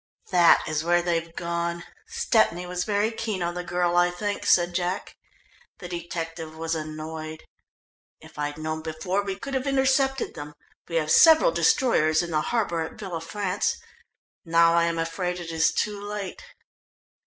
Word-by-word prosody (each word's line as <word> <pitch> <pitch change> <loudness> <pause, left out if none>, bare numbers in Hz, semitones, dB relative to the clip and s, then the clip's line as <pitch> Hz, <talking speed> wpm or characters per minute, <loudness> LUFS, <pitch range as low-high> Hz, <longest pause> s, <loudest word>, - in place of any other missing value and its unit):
"That 175 -2 +6
is 155 0 -1
where 175 +1 +2
they've 170 -1 -1
gone. 170 0 -3 0.2
Stepney 230 - +1
was 180 0 -3
very 210 +1 +1
keen 215 -5 -3
on 170 0 -2
the 180 0 -4
girl, 175 0 0
I 175 0 +4
think," 205 +3 -4
said 175 0 +4
Jack. 180 +2 -2 0.6
The 180 - -8
detective 165 -2 -6
was 165 0 -2
annoyed. 155 0 -6 0.8
"If - - -14
I'd 145 0 -3
known 155 0 -4
before 165 +5 -2
we 195 -1 -4
could 275 +7 -7
have 265 +1 -1
intercepted 270 -1 +1
them. 145 0 -9 0.3
We 165 - -5
have 155 -2 +1
several 325 +10 +7
destroyers 230 - +3
in 170 - -6
the 155 -1 +1
harbour 205 -7 -1
at 160 - -5
Villafrance. 190 - -2 0.7
Now 165 0 +4
I 170 0 +4
am 170 0 -1
afraid 180 +2 -2
it 170 -1 -6
is 160 0 +2
too 205 -1 -2
late." 205 -2 -6
175 Hz, 160 wpm, -25 LUFS, 165-205 Hz, 0.8 s, several